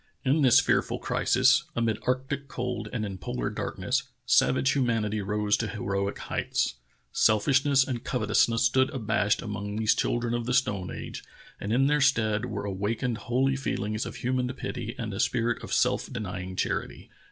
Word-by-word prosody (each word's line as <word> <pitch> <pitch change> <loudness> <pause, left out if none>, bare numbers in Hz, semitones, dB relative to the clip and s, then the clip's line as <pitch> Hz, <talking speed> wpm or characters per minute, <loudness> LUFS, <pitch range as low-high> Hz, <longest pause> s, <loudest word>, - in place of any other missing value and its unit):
In 140 +4 +3
this 130 -4 +7
fearful - - +1
crisis, - - +3
amid 115 -2 0
arctic 135 +2 -1
cold 125 -5 -4
and 110 -4 -2
in 95 -2 -6
polar 60 -7 -3
darkness, 130 +2 -1 0.2
savage 130 +1 +3
humanity 115 -5 0
rose 105 +1 +1
to 115 - -2
heroic 100 -3 -2
heights. - - -1 0.4
Self 110 -2 +3
ishness 135 0 +4
and 125 -4 -3
covetousness 115 -1 +2
stood 130 +3 +3
abashed 110 -4 0
among 105 -2 -4
these 110 0 +3
children 120 0 -1
of 120 -1 -2
the 125 - +1
stone 100 -8 0
age, - - -7 0.4
and 100 - -4
in 130 +4 +3
their 150 +1 +2
stead 110 -7 +2
were 100 -3 -4
awa 100 +3 -1
kened 120 -1 -2
holy 130 +4 +1
feelings 110 -4 -2
of - - -7
human 125 0 -1
pity 120 -3 -5
and 110 -3 -4
a 95 - -5
spirit 120 0 +1
of - - -8
self - - +1
denying 95 -6 -5
charity. - - -3
115 Hz, 170 wpm, -27 LUFS, 105-130 Hz, 0.4 s, this